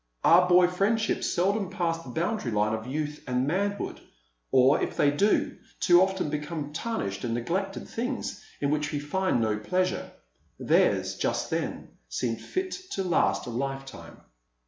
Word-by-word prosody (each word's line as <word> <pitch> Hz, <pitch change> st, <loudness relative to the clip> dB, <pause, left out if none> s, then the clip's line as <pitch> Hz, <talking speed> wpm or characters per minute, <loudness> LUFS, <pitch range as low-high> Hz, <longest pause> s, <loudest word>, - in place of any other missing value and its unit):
Our 180 Hz, +2 st, +6 dB
boy 180 Hz, 0 st, +7 dB
friendships 200 Hz, +5 st, +1 dB
seldom 195 Hz, +2 st, +1 dB
pass 170 Hz, -4 st, -1 dB
the 135 Hz, -, -11 dB
boundary 170 Hz, -, -1 dB
line 105 Hz, +1 st, +1 dB
of 110 Hz, +1 st, -4 dB
youth 150 Hz, +2 st, -3 dB
and 125 Hz, 0 st, +1 dB
manhood; 200 Hz, +6 st, -2 dB, 0.5 s
or, 130 Hz, +2 st, +5 dB
if -, -, -3 dB
they 145 Hz, -, +4 dB
do, 200 Hz, +9 st, +1 dB, 0.2 s
too 175 Hz, 0 st, +6 dB
often 190 Hz, -5 st, 0 dB
become 150 Hz, 0 st, -4 dB
tarnished 150 Hz, -, -3 dB
and 115 Hz, -2 st, -1 dB
neglected 190 Hz, +11 st, -2 dB
things 245 Hz, +3 st, -4 dB, 0.2 s
in 140 Hz, 0 st, 0 dB
which 150 Hz, 0 st, 0 dB
we 145 Hz, -, -1 dB
find 185 Hz, +1 st, 0 dB
no 110 Hz, -2 st, 0 dB
pleasure. 185 Hz, -, -1 dB, 0.5 s
Theirs, -, -, +2 dB
just -, -, -1 dB
then, -, -, -3 dB, 0.2 s
seemed -, -, -2 dB
fit 370 Hz, 0 st, -3 dB, 0.2 s
to 195 Hz, -, -1 dB
last 180 Hz, -3 st, +1 dB
a 120 Hz, -, -5 dB
lifetime. 135 Hz, +2 st, -5 dB
165 Hz, 155 wpm, -27 LUFS, 135-190 Hz, 0.5 s, boy